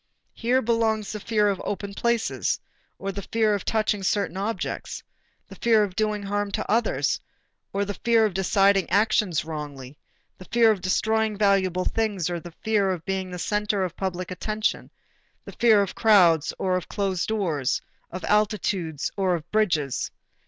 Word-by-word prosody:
Here 250 Hz, +3 st, +1 dB
belongs 220 Hz, -2 st, +1 dB
the 210 Hz, -, -5 dB
fear 210 Hz, 0 st, +1 dB
of 195 Hz, -2 st, -1 dB
open 200 Hz, 0 st, -4 dB
places 235 Hz, +1 st, 0 dB, 0.4 s
or 195 Hz, -, -4 dB
the 200 Hz, -, -5 dB
fear 220 Hz, +1 st, +1 dB
of 200 Hz, -, -2 dB
touching 215 Hz, -2 st, 0 dB
certain 195 Hz, -2 st, 0 dB
objects, 205 Hz, +4 st, -4 dB, 0.4 s
the -, -, -12 dB
fear 225 Hz, -2 st, +3 dB
of 190 Hz, -3 st, -4 dB
doing 215 Hz, -1 st, 0 dB
harm 205 Hz, +1 st, -1 dB
to -, -, -2 dB
others 230 Hz, +3 st, +1 dB, 0.5 s
or 200 Hz, +1 st, -1 dB
the 205 Hz, -, -3 dB
fear 225 Hz, +3 st, +3 dB
of 210 Hz, -, -1 dB
deciding 195 Hz, 0 st, +3 dB
actions 205 Hz, -6 st, +2 dB
wrongly, 145 Hz, -3 st, -7 dB, 0.4 s
the 185 Hz, -, -10 dB
fear 230 Hz, +1 st, +4 dB
of 200 Hz, -4 st, -2 dB
destroying 220 Hz, +3 st, +1 dB
valuable 190 Hz, -3 st, +2 dB
things 205 Hz, -6 st, -1 dB
or 175 Hz, -, -2 dB
the 175 Hz, 0 st, -11 dB
fear 210 Hz, -3 st, +2 dB
of 180 Hz, -3 st, -3 dB
being 190 Hz, -1 st, -2 dB
the 180 Hz, -, -6 dB
center 210 Hz, +1 st, 0 dB
of 180 Hz, -, -4 dB
public 185 Hz, -1 st, -4 dB
attention, 215 Hz, +4 st, -2 dB, 0.6 s
the -, -, -8 dB
fear 220 Hz, -4 st, +4 dB
of 195 Hz, -, -5 dB
crowds 175 Hz, -8 st, +4 dB
or 185 Hz, -1 st, 0 dB
of 185 Hz, -, -3 dB
closed 195 Hz, -3 st, -1 dB
doors, 170 Hz, -12 st, 0 dB, 0.3 s
of 185 Hz, -, -6 dB
altitudes 200 Hz, -7 st, 0 dB
or 190 Hz, -3 st, +1 dB
of 165 Hz, 0 st, -8 dB
bridges. 165 Hz, -, +1 dB
200 Hz, 165 wpm, -25 LUFS, 185-215 Hz, 0.6 s, fear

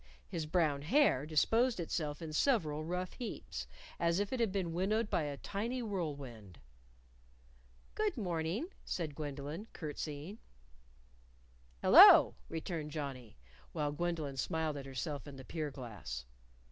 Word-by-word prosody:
His 160 Hz, -2 st, -3 dB
brown 155 Hz, -4 st, +2 dB
hair 155 Hz, -, +3 dB
disposed 225 Hz, -, +3 dB
itself 155 Hz, -2 st, -2 dB
in 155 Hz, -1 st, -5 dB
several 155 Hz, -, +2 dB
rough 180 Hz, +3 st, -3 dB
heaps, 240 Hz, -, -6 dB, 0.3 s
as 170 Hz, +2 st, +2 dB
if 205 Hz, +4 st, -1 dB
it 260 Hz, -, -1 dB
had 230 Hz, -4 st, +2 dB
been 185 Hz, -4 st, -1 dB
winnowed 210 Hz, +5 st, 0 dB
by -, -, +2 dB
a 145 Hz, -1 st, -4 dB
tiny 235 Hz, -, -3 dB
whirlwind. 140 Hz, -, -5 dB, 1.4 s
"Good 425 Hz, -7 st, 0 dB
morning," 180 Hz, -, -2 dB
said 160 Hz, -4 st, -3 dB
Gwendolyn, 145 Hz, +6 st, -5 dB
curtseying. 155 Hz, +5 st, -5 dB, 1.4 s
"Hello!" -, -, +10 dB, 0.2 s
returned 160 Hz, -1 st, -4 dB
Johnnie 135 Hz, -, -6 dB, 0.4 s
while 150 Hz, -3 st, 0 dB
Gwendolyn 155 Hz, -3 st, -2 dB
smiled 160 Hz, +3 st, -1 dB
at 140 Hz, -1 st, -6 dB
herself 140 Hz, +3 st, -4 dB
in 140 Hz, -, -8 dB
the 130 Hz, -1 st, -10 dB
pier 155 Hz, 0 st, -3 dB
glass. 105 Hz, -, -7 dB
160 Hz, 130 wpm, -34 LUFS, 145-190 Hz, 1.4 s, Hello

